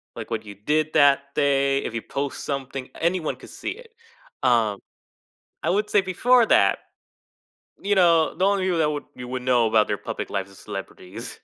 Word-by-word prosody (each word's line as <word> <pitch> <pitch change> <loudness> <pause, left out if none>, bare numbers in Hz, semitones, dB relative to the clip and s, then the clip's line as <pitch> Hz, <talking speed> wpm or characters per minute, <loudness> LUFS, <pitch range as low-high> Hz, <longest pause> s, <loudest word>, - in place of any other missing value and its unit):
like, - - -8
what 110 -1 -3
you 100 -1 -9
did 155 +9 0
that 140 -1 +4
day, 140 -1 +2
if 120 - -5
you 115 - -3
post 140 0 -4
something, 135 -1 -4
anyone 170 -1 0
could - - -14
see - - -5
it. 475 -1 -11 0.5
Um, - - +2 0.8
I - - 0
would 210 +3 +1
say 205 - +4
before 230 +6 +3
that, 340 +4 +4 1.0
you 205 +1 +1
know, 170 -3 +4
the 185 +3 +1
only 200 -1 +2
people 180 -3 0
that 150 -2 +3
would 145 -1 -4
you 125 0 -8
would 125 0 -4
know 120 -3 +3
about 110 -1 +4
their - - -1
public - - -5
lives 100 -1 -3
is 95 - -17
celebrities 95 -2 -8
140 Hz, 190 wpm, -24 LUFS, 125-180 Hz, 1.0 s, that